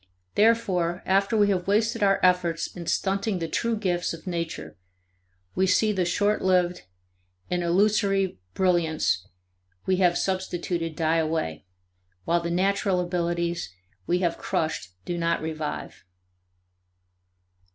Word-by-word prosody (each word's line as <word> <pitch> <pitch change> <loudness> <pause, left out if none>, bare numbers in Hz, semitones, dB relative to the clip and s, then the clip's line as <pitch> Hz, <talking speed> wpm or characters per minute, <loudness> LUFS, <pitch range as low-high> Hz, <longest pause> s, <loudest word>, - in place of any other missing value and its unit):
Therefore 190 -6 +2
after 195 +3 +2
we 205 -1 +4
have 185 -2 0
wasted 220 +3 +1
our 195 -1 +4
efforts 180 -2 +2
in 170 -2 -7
stunting 195 +1 0
the 165 -2 -3
true 230 +7 -1
gifts 175 -5 -1
of 160 - -15
nature 165 - -4 0.8
we 190 +1 +2
see 215 +4 +3
the 185 -3 0
short 205 +4 +1
lived 180 -1 +2 0.7
and 180 0 +1
illusory 195 - +2 0.2
brilliance 160 - +1 0.6
we 190 -1 +2
have 180 -2 +3
substituted 175 -3 -2
die 160 0 +1
away, 155 - -2 0.6
while 170 0 +2
the 170 - -3
natural 190 +1 +1
abilities 170 - -1 0.4
we 175 - +2
have 170 - -1
crushed 155 - -2
do 175 -1 -3
not 170 0 +1
revive." 155 -1 -5
180 Hz, 125 wpm, -26 LUFS, 170-195 Hz, 0.8 s, we